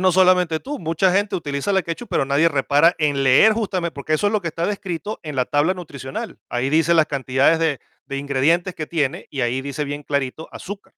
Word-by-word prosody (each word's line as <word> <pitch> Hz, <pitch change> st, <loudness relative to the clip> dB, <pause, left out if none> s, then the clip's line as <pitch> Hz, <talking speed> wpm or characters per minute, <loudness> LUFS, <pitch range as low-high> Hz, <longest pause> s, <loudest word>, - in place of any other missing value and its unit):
No 185 Hz, 0 st, +4 dB
solamente 180 Hz, -2 st, +3 dB
tú, 285 Hz, -, -6 dB
mucha 165 Hz, +3 st, +1 dB
gente 200 Hz, +1 st, +1 dB
utiliza 145 Hz, +3 st, -2 dB
la 190 Hz, -1 st, +2 dB
ketchup, 170 Hz, +9 st, -6 dB
pero -, -, +1 dB
nadie 140 Hz, +5 st, +3 dB
repara 145 Hz, +4 st, +3 dB
en 145 Hz, -3 st, +1 dB
leer 135 Hz, +12 st, +6 dB
justame 190 Hz, -6 st, -2 dB
porque 150 Hz, +2 st, -2 dB
eso 205 Hz, -, +1 dB
es 205 Hz, -, +1 dB
lo 215 Hz, -, +1 dB
que 170 Hz, -, -3 dB
está 165 Hz, +2 st, -2 dB
descrito 195 Hz, -1 st, -4 dB
en 150 Hz, -4 st, -6 dB
la 130 Hz, -, +2 dB
tabla 145 Hz, +7 st, +1 dB
nutricional. 140 Hz, -7 st, -7 dB
Ahí 125 Hz, +3 st, -1 dB
dice 165 Hz, +2 st, +3 dB
las 160 Hz, -2 st, +4 dB
cantidades 135 Hz, +3 st, +2 dB
de 160 Hz, -6 st, 0 dB, 0.3 s
de 140 Hz, 0 st, -3 dB
ingredientes 145 Hz, +6 st, +1 dB
que 155 Hz, -, -4 dB
tiene 160 Hz, +2 st, -2 dB
y 135 Hz, -, -3 dB
ahí 120 Hz, +2 st, 0 dB
dice 140 Hz, +2 st, -3 dB
bien 145 Hz, 0 st, -6 dB
clarito, 140 Hz, +2 st, -3 dB
azúcar. 200 Hz, +1 st, -9 dB
160 Hz, 220 wpm, -21 LUFS, 140-180 Hz, 0.3 s, leer